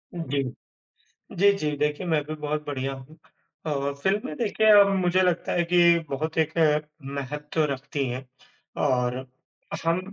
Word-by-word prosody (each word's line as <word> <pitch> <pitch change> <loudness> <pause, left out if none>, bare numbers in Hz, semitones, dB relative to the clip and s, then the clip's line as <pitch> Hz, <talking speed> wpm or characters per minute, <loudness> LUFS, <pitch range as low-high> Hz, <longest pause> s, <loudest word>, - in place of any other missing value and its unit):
जी। 145 -5 -1 0.9
जी, 200 +2 +6
जी, 155 -6 -2
देखिए 150 +5 -1
मैं 155 -3 +2
भी 155 - -5
बहुत 150 0 -3
बढ़िया 135 -1 -2
हूँ। 135 +4 -12 0.5
अ, 140 -2 -1
फ़िल्में 195 -5 0
देखिए 220 -1 +1
अम, 200 0 +4
मुझे 185 0 +2
लगता 180 -2 +1
है 175 - +2
कि 170 0 +5
बहुत 155 +4 -3
एक 160 0 +1 0.6
महत्व 150 +3 -2
रखती 135 +1 -3
हैं 130 +2 -5 0.6
और 125 -1 0 0.6
हम 165 +2 +2
150 Hz, 140 wpm, -25 LUFS, 140-170 Hz, 0.9 s, जी